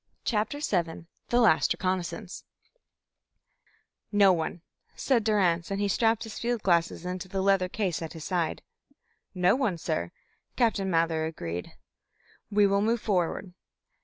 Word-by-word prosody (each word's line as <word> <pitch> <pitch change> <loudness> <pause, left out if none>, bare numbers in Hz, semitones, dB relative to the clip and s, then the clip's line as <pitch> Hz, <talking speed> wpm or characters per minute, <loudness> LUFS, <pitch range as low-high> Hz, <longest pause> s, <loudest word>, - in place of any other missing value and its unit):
CHAPTER 220 +5 0
VII 170 - -1 0.2
THE 240 - +3
LAST 215 -10 +4
RECONNAISSANCE 185 +1 -3 1.7
"No 200 -2 +6
one," 165 0 -3 0.3
said 245 -5 +1
Durrance, 185 -6 +2
and 195 0 -2
he 205 - +1
strapped 225 +2 +2
his 225 -2 -7
field 240 -2 -1
glasses 170 -1 +1
into 180 +1 -4
the 190 +1 -3
leather 195 -2 +3
case 185 -5 -2
at 160 - -6
his 160 -2 -8
side. 175 -3 -1 0.7
"No 180 +3 +4
one, 240 -10 0
sir," 85 - -2 0.5
Captain 210 -5 +1
Mather 165 -2 +1
agreed. 85 - -6 0.8
"We 205 -1 +4
will 200 0 +2
move 230 +3 +1
forward." 180 -2 -1
190 Hz, 135 wpm, -28 LUFS, 170-210 Hz, 1.7 s, No